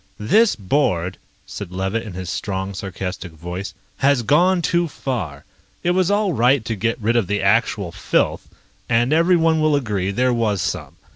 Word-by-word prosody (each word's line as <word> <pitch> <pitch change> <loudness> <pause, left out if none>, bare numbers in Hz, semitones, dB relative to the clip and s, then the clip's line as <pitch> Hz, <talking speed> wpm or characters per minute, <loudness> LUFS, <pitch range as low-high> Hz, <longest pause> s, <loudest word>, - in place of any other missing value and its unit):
"This 210 - +3
board," 95 - 0 0.3
said - - -7
Levitt 95 +4 -2
in 110 -4 -8
his 90 0 -6
strong, 95 +1 -3
sarcastic 90 -2 -6
voice, 90 +4 -6 0.2
"has 140 -3 +2
gone 175 - +3
too 170 +1 +1
far. 110 - -5 0.4
It 175 - +2
was 185 0 +2
all 205 -2 +1
right 125 0 +3
to 115 - -2
get 115 +4 -1
rid 115 +2 0
of 115 -6 +2
the 105 0 -1
actual 100 -2 +1
filth... - - 0 0.4
and 120 +4 +2
everyone 165 -1 +3
will 155 -1 +3
agree 105 -9 -1
there 125 +5 +1
was 110 -4 0
some. - - -3
115 Hz, 165 wpm, -21 LUFS, 95-145 Hz, 0.4 s, This